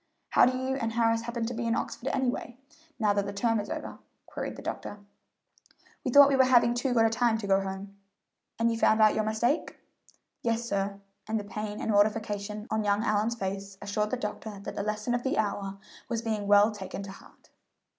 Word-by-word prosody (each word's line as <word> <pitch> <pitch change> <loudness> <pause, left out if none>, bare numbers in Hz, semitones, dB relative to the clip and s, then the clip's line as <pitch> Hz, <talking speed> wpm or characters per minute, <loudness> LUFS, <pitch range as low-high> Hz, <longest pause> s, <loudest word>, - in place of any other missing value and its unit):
"How - - +6
do 255 0 0
you 260 +1 -1
and 225 -3 -2
Harris 230 -1 +2
happen 235 0 -3
to 240 - -3
be 235 0 -3
in 230 - +2
Oxford 255 - -4
anyway, 250 -2 -2 0.4
now 210 -3 +2
that 200 0 0
the - - -3
term 225 +2 +1
is 205 - -5
over?" - - -6 0.3
queried - - -5
the - - -10
doctor. 205 - -5 1.1
"We - - -1
thought 280 +2 +8
we 280 - +2
were 265 - +6
having 240 -2 +5
too 245 +1 -1
good 225 -1 +5
a - - +4
time 230 -1 +2
to 220 - -5
go 195 0 +3
home." 195 +1 -7 0.6
"And 230 0 +2
you 230 - -1
have - - -11
found 220 - +4
out 215 -1 +6
your 215 - 0
mistake?" 225 +7 0 0.6
"Yes, 230 0 0
sir;" 200 -1 -2 0.3
and 220 0 0
the - - -5
pain 210 +1 -5
and - - -1
mortification 210 0 0
on 220 0 +1
young 205 +1 +1
Allyn's 215 +1 +1
face 195 -1 -5
assured 210 +1 -1
the 255 - -1
doctor 210 -2 -5
that - - -5
the - - -3
lesson 215 +3 -2
of 245 - 0
the 265 - -1
hour 200 -2 -1 0.3
was 230 -2 -2
being 215 -3 -2
well 205 +2 +6
taken 195 -1 -6
to 195 - -7
heart. - - -17
220 Hz, 215 wpm, -28 LUFS, 205-235 Hz, 1.1 s, thought